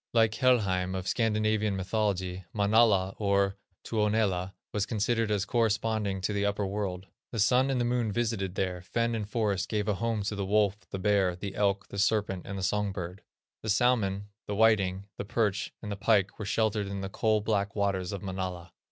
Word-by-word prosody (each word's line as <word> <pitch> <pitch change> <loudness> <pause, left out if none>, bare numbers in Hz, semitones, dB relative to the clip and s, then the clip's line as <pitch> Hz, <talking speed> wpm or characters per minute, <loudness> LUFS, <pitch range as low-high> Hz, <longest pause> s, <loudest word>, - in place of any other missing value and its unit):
Like 110 -2 +4
Helheim 100 -7 +2
of 95 0 -4
Scandinavian 110 -2 +1
mythology, 95 -2 -1
Manala, 100 -2 +3
or 100 -1 +2 0.3
Tuonela, 105 -4 0 0.2
was 105 0 0
considered 115 0 0
as 105 -2 +1
corresponding 110 -3 0
to 105 - -1
the 100 0 0
upper 100 0 0
world. 95 -2 -3 0.3
The 115 - -5
Sun 125 +5 +4
and 130 -2 +1
the 120 - +1
Moon 120 -2 0
visited 105 -5 -1
there; 90 -2 -1
fen 115 +6 -1
and 105 -2 -3
forest 100 -4 0
gave 105 -1 -1
a 105 - +2
home 115 +1 -1
to 105 - -2
the 100 - -2
wolf, 100 0 +2
the - - -4
bear, 95 -2 +2
the 95 +2 -6
elk, 100 -1 0
the 100 - -5
serpent, 100 -3 +1
and 100 0 -4
the 95 - -4
songbird; 95 -2 -2 0.4
the 110 - -5
salmon, 105 -3 +2 0.2
the 105 - -2
whiting, 100 -3 +3
the - - -3
perch, 100 -4 0
and 105 - -4
the - - -2
pike 100 -1 +2
were 105 - -4
sheltered 105 -1 0
in 100 0 -4
the 95 - -3
"coal 110 +2 +1
black 100 -2 -1
waters 100 -3 0
of 100 -1 -5
Manala." 95 -3 -5
100 Hz, 185 wpm, -29 LUFS, 95-110 Hz, 0.4 s, Like